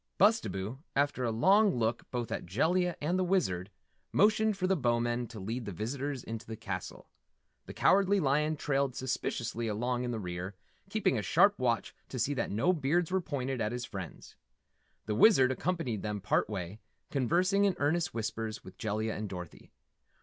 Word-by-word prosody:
Bustabo, 135 - +2
after 140 -2 +1
a 120 - +1
long 195 - +4
look 115 -1 -1
both 120 -3 -3
at - - -4
Jellia 175 - +1
and 170 +5 0
the - - +2
Wizard, 105 - 0 0.4
motioned 215 0 +3
for 185 - -1
the 190 +1 +3
Bowmen 120 -3 0
to 115 -1 -9
lead 115 +5 -4
the 100 - -4
visitors 130 - -3
into 115 -1 -6
the 110 - -5
castle. 95 -4 -6 0.6
The - - -8
Cowardly 200 +1 +4
Lion 150 0 +2
trailed 140 -2 0
suspiciously 120 -2 -2
along 120 +3 -1
in 125 - -2
the 120 - -2
rear, 90 +1 -5 0.3
keeping 200 - +1
a - - -1
sharp 200 - +4
watch 120 -2 0 0.2
to 130 - -5
see 140 +4 +1
that 135 - -2
no 120 - +2
beards 165 +3 +1
were 190 0 +2
pointed 135 -6 -3
at 105 0 0
his 125 0 -3
friends. 95 -6 -8 0.7
The 105 - -1
Wizard 130 - +6
accompanied 145 - -2
them 105 -1 -3
part 95 - +1
way, 95 0 -5 0.3
conversing 180 - +2
in 195 -3 +2
earnest 165 +4 +1
whispers 110 -1 -4
with - - -13
Jellia 110 +1 -1
and 105 -1 -4
Dorothy. 90 -3 -9
125 Hz, 175 wpm, -31 LUFS, 110-175 Hz, 0.7 s, Wizard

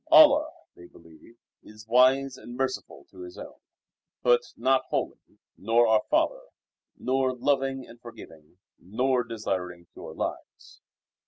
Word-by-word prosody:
Allah 310 -1 +7 0.3
(they 85 - -14
believe) 85 +9 -19 0.2
is 110 +1 -15
wise 130 +3 +4
and 120 -1 -11
merciful 130 - -4
to - - -16
His 355 0 -10
own, - - -11 0.6
but 485 -1 +4 0.2
not 135 0 +2
holy, - - -3 0.4
nor 115 +3 +3
our 110 -1 +4
Father, 325 +11 +1 0.6
nor 130 0 0
loving 135 0 -1
and 120 +1 -16
forgiving, 80 -9 -14 0.2
nor 125 +6 0
desiring 95 -6 -5
pure - - -10
lives. - - -7
125 Hz, 130 wpm, -26 LUFS, 110-135 Hz, 0.6 s, Allah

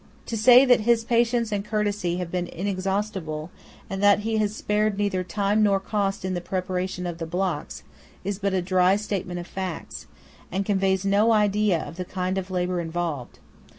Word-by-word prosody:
To 230 - -4
say 245 +4 +7
that 250 -2 +5
his 230 +1 +2
patience 235 -1 +1
and 200 -1 -1
courtesy 205 -4 -1
have 180 -2 -4
been 180 -1 -2
inexhaustible, 190 -4 -3 0.4
and 195 0 -4
that 205 0 +5
he 220 +1 -1
has 210 -1 0
spared 210 -1 0
neither 200 -3 0
time 205 +3 0
nor 200 -2 +3
cost 195 -1 -2
in 185 - -1
the 175 - -2
preparation 185 0 -3
of 175 -1 -5
the 165 - -4
blocks, 185 +3 -3 0.4
is 200 -1 -3
but 200 -1 0
a 185 - 0
dry 185 +1 +3
statement 195 -4 -3
of 175 - -6
facts, 185 -2 -6 0.4
and 195 +2 -1
conveys 190 -1 +1
no 205 +3 +4
idea 210 -3 +3
of 165 - -9
the 185 - -2
kind 185 +1 -2
of 190 0 -7
labour 180 -1 -1
involved. 165 -6 -4
195 Hz, 185 wpm, -25 LUFS, 180-210 Hz, 0.4 s, say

